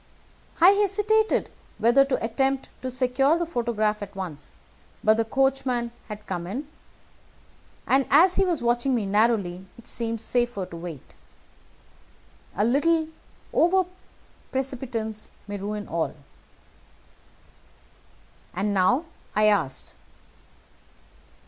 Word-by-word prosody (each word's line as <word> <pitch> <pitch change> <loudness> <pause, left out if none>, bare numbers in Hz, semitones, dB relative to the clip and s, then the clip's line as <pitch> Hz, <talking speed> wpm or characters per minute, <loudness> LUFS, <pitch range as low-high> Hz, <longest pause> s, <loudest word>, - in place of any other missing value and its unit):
I 345 +2 +9
hesitated 415 +2 +2 0.3
whether 240 +4 +5
to 275 -4 -1
attempt 270 +4 0
to 255 - -3
secure 255 +4 +2
the 345 - -1
photograph 225 -7 -1
at 200 0 -7
once; 165 -7 -7 0.5
but 215 0 +5
the 225 - +1
coachman 260 -1 0 0.2
had 210 -1 -8
come 175 -2 -4
in, 260 +10 -4 1.2
and 270 0 +3
as 350 +6 +6
he 390 - +2
was 340 -9 0
watching 240 +2 +2
me 225 -4 0
narrowly, 195 -3 +1
it 235 - -15
seemed 230 -1 -3
safer 240 -3 -1
to 180 - -10
wait. 165 -5 -8 1.4
A 205 - +2
little 315 +6 +2 0.4
over 370 +2 +4 0.7
precipitance 245 -5 -3 0.2
may 205 0 -4
ruin 205 +1 -4
all." 165 -1 -2 2.4
"And 200 +3 0
now?" 225 - +3 0.3
I 215 - +4
asked. 180 -11 +1
235 Hz, 110 wpm, -25 LUFS, 205-275 Hz, 2.4 s, I